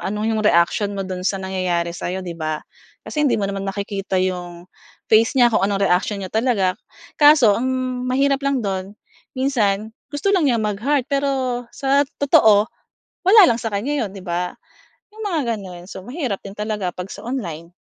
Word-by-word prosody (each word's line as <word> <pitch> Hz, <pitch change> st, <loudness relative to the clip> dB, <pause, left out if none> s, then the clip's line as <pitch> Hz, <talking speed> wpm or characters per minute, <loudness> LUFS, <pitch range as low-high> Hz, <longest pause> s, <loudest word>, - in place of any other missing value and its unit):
ano 210 Hz, +2 st, -3 dB
'yong 220 Hz, -1 st, 0 dB
reaksyon 200 Hz, +1 st, +2 dB
mo 195 Hz, -, -2 dB
do'n 185 Hz, -1 st, -5 dB
sa 195 Hz, -, -1 dB
nangyayari 185 Hz, -3 st, -2 dB
sa'yo 185 Hz, +2 st, -4 dB
'di 175 Hz, -, -5 dB
ba. 155 Hz, -2 st, -4 dB, 0.4 s
Kasi 300 Hz, -1 st, 0 dB
hindi -, -, +2 dB
mo 205 Hz, -, -1 dB
naman 195 Hz, 0 st, -3 dB
nakikita 200 Hz, -1 st, -3 dB
'yong 180 Hz, -2 st, -2 dB, 0.5 s
face 225 Hz, +4 st, +5 dB
niya 240 Hz, -2 st, +5 dB
kung 215 Hz, -, +3 dB
anong 200 Hz, 0 st, +1 dB
reaksyon 195 Hz, +2 st, +1 dB
niya 185 Hz, -, -8 dB
talaga, 220 Hz, -5 st, +2 dB, 0.5 s
kaso 290 Hz, -7 st, +7 dB
ang 245 Hz, +5 st, -1 dB, 0.4 s
mahirap 275 Hz, +2 st, +2 dB
lang 275 Hz, -4 st, 0 dB
do'n, 195 Hz, +1 st, -4 dB, 0.4 s
minsan 220 Hz, -6 st, 0 dB, 0.2 s
gusto 290 Hz, +8 st, -1 dB
lang 340 Hz, -8 st, +3 dB
niya 240 Hz, -, +2 dB
mag-heart 225 Hz, +6 st, 0 dB
pero 270 Hz, -3 st, -1 dB
sa 275 Hz, +1 st, +1 dB, 0.2 s
totoo, 220 Hz, -9 st, +5 dB, 0.6 s
wala 420 Hz, +4 st, +8 dB
lang 230 Hz, -, +1 dB
sa 225 Hz, -, -2 dB
kaniya 270 Hz, +6 st, -1 dB
'yon 195 Hz, -, -7 dB
'di 195 Hz, -, -8 dB
ba. 175 Hz, 0 st, -2 dB, 0.6 s
‘Yong 440 Hz, +1 st, -9 dB
mga 335 Hz, -6 st, 0 dB, 0.2 s
gano'n, 180 Hz, -3 st, -9 dB
so -, -, -7 dB
mahirap 250 Hz, -, -3 dB
din 195 Hz, -, -7 dB
talaga 210 Hz, -4 st, -3 dB
'pag 180 Hz, +1 st, -6 dB
sa -, -, -8 dB
online. 175 Hz, -, -5 dB
210 Hz, 180 wpm, -21 LUFS, 190-265 Hz, 0.6 s, wala